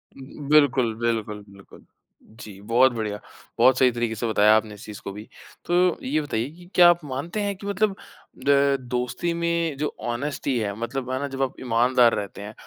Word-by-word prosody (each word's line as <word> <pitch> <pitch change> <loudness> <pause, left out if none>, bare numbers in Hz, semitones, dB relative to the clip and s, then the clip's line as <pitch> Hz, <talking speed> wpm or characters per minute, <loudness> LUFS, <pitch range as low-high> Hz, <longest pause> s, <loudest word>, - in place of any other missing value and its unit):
बिल्कुल, 140 -3 +1
बिल्कुल, 110 -3 -2
बिल्कुल। 100 0 -17 0.6
जी 100 -2 -10
बहुत 130 +3 +5
बढ़िया, 105 -2 -4 0.4
बहुत 130 -1 +5
सही 130 -1 +5
तरीक़े 120 -1 -2
से 115 +2 -3
बताया 110 0 +5
आपने 110 -1 -3
इस 105 - -12
चीज़ 105 -1 -9
को 100 - -6
भी। 105 +2 -10 0.4
तो 180 0 +2
ये 150 +4 0
बताइए 125 -3 -3
कि 175 +2 -16
क्या 175 -1 +8
आप 175 -2 +2
मानते 145 +10 -4
हैं 200 -1 -2
कि 200 +2 -9
मतलब 200 0 0
अ, 140 +1 0
दोस्ती 125 +7 -3
में 170 -3 -1
जो 150 +1 -2 0.2
ऑनेस्टी 135 +1 -2
है 100 -2 -2
मतलब 125 +2 -4
है 130 - -1
ना 145 - -3
जब 135 0 -6
आप 135 0 -2
ईमानदार 120 0 +3
रहते 100 -1 -6
हैं, 105 +1 -8
130 Hz, 190 wpm, -24 LUFS, 115-150 Hz, 0.6 s, क्या